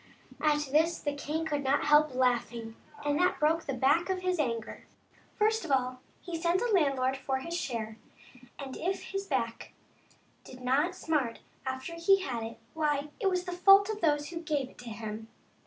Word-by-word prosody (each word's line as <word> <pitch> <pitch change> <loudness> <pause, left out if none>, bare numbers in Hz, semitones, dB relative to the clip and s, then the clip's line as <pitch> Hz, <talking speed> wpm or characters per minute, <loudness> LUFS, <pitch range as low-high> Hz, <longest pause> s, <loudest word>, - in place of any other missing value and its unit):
At 295 -2 +2
this 320 +3 +3
the 290 - -2
king 300 +3 -3
could 290 -3 -1
not 275 +2 +2
help 295 -2 +4
laughing, 240 -3 0 0.3
and 290 0 +1
that 360 0 +2
broke 320 +2 +2
the 275 - -1
back 285 +8 +3
of 370 -1 -1
his 365 -2 0
anger. 230 -6 -3 0.5
First 440 +1 +2
of 335 - -7
all 255 -1 +1 0.2
he 335 -3 -5
sent 340 +1 +3
the 485 +1 0
landlord 270 -7 +2
for 265 0 -2
his 335 +6 -5
share, 225 -9 -4 0.6
and 270 -2 -7
if 375 +3 -2
his 390 0 -3
back 230 -5 -2 0.7
did 255 - -12
not 280 +8 +1
smart 285 -10 -1 0.3
after 260 +5 -4
he 380 +4 +4
had 245 -9 -3
it, 225 +1 -6 0.2
why, 300 -2 0
it 395 - +2
was 365 -1 -1
not 360 - -4
the 355 - -16
fault 395 +2 +7
of 425 - -6
those 295 -2 +2
who 345 - -6
gave 290 -5 -2
it - - -21
to 245 -1 -8
him. 220 0 -6
295 Hz, 190 wpm, -30 LUFS, 255-340 Hz, 0.7 s, fault